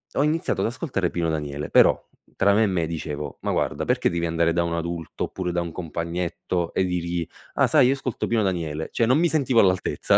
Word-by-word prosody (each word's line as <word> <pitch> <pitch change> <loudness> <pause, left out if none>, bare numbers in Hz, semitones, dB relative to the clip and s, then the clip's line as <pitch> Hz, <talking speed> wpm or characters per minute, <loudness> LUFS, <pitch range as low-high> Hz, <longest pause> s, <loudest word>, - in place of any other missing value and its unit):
ho 140 - +3
iniziato 155 -9 0
ad 100 - +1
ascoltare 115 - -2
Pino 85 -2 -1
Daniele. 75 -2 -3
Però - - +4 0.3
tra 100 0 +4
me 110 +2 +4
e - - +4
me 90 -4 0
dicevo: 75 -3 -5
"Ma - - -1
guarda - - -1
perché - - +2
devi 85 0 -1
andare 85 0 +1
da 85 0 +2
un 85 0 -2
adulto 85 -1 -3
oppure 90 -2 -4
da 85 - 0
un 85 -1 -5
compagnetto 85 +1 -3
e 95 - +2
dirgli: 85 -1 -2 0.3
"Ah, - - +3
sai, 145 -5 +5
io 135 - +4
ascolto 130 -3 -3
Pino 115 -2 +1
Daniele". 80 -5 -2
Cioè, 115 - +2
non 130 +5 +4
mi 170 -1 +3
sentivo 135 -6 +2
all'altezza, 95 -1 +2
85 Hz, 220 wpm, -24 LUFS, 85-110 Hz, 0.3 s, sai